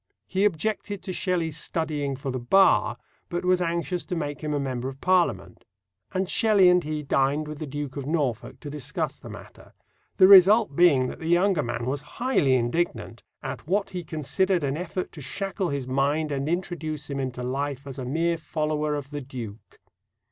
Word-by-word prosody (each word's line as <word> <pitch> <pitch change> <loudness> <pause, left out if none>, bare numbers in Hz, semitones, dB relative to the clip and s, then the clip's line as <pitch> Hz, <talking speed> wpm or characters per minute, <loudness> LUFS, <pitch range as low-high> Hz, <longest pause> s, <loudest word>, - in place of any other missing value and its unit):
He 190 +2 +1
objected 205 +2 -1
to 185 - -4
Shelley's 170 -5 -1
studying 150 -5 -2
for 135 0 -4
the 130 - -3
Bar, 190 +11 +4 0.3
but 175 0 -3
was 180 0 +3
anxious 170 +1 -1
to 180 - -3
make 145 -3 -4
him 150 -1 -3
a 145 - 0
member 130 -2 -3
of 135 0 -11
Parliament; 185 +1 +1 0.5
and 190 0 -1
Shelley 205 -3 +5
and 180 0 +4
he 150 0 -3
dined 140 +2 +1
with 150 -1 -7
the 155 - -5
Duke 145 -1 -5
of 140 -1 -4
Norfolk 130 -5 -2
to 145 - -7
discuss 150 -3 -3
the - - -11
matter, - - -13 0.4
the 185 - +8
result 200 -2 +7
being 150 -7 +5
that - - -6
the 160 - -5
younger 175 -1 +3
man 120 -2 -3
was 135 +2 -2 0.2
highly 235 - +2
indignant 130 +8 -1 0.2
"at - - -6
what 200 +3 0
he 180 -2 -4
considered 170 +4 0
an 140 0 0
effort 180 +2 -4
to 155 - -10
shackle 195 +6 -3
his 140 -2 -3
mind, 140 +4 0
and 140 +1 -2
introduce 160 -4 -3
him 140 -1 -4
into 130 -2 -3
life 135 +2 -3
as 135 -1 -7
a - - -4
mere 165 +5 0
follower 150 -1 -1
of 145 -1 -6
the 145 0 -4
Duke." 120 -5 -9
150 Hz, 190 wpm, -26 LUFS, 135-180 Hz, 0.5 s, the